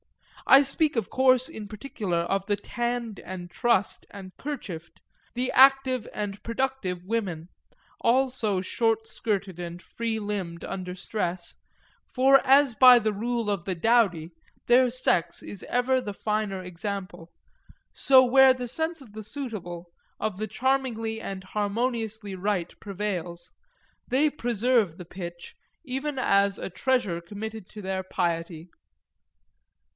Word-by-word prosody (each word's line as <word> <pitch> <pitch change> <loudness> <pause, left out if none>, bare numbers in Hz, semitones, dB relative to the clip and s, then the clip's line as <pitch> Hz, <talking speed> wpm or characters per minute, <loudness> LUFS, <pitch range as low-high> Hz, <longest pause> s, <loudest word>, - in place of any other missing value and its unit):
I 275 +1 +8
speak 285 +2 +1
of 225 - -1
course 255 -1 +4
in 215 -2 -7
particular 210 -4 -4
of 195 +3 -2
the 205 - +2
tanned 235 +1 -3
and 180 -1 -8
trussed 235 -5 0
and 190 -2 -11
kerchiefed, 195 - -7 0.4
the 250 +1 -1
active 265 -2 +5
and 205 -1 -5
productive 230 -7 -2
women, 185 -6 -3 0.5
all 260 +2 +3
so 215 -6 -1
short 225 +3 0
skirted 200 -5 -3
and 175 0 -6
free 230 +4 -4
limbed 195 -5 -4
under 180 -1 -5
stress; 180 -2 -4 0.6
for 270 +1 +6
as 275 -1 +5
by 250 +2 +8
the 215 -2 0
rule 230 +1 -2
of 200 -4 -1
the 185 - -2
dowdy 180 -5 +2 0.3
their 250 +1 +5
sex 240 -8 +1
is 200 - -8
ever 255 +1 +2
the 205 -4 -6
finer 210 -3 -2
example, 180 -1 -6 0.6
so 265 -1 +6
where 265 +1 +7
the 250 -1 -5
sense 320 +5 -2
of 230 -6 -15
the 215 0 -7
suitable, 190 -9 -7 0.3
of 215 -3 -2
the 215 +2 -3
charmingly 240 -4 -1
and 195 -3 -6
harmoniously 220 +1 -2
right 185 -2 -2
prevails, 185 -4 -5 0.5
they 275 +5 +3
preserve 235 - +1
the 180 - -9
pitch 175 -1 -8 0.3
even 270 +2 -3
as 200 -5 +3
a - - -5
treasure 210 -6 0
committed 210 +3 -7
to 210 -1 -10
their 190 0 -2
piety. 170 -2 -3
215 Hz, 135 wpm, -26 LUFS, 185-250 Hz, 0.6 s, I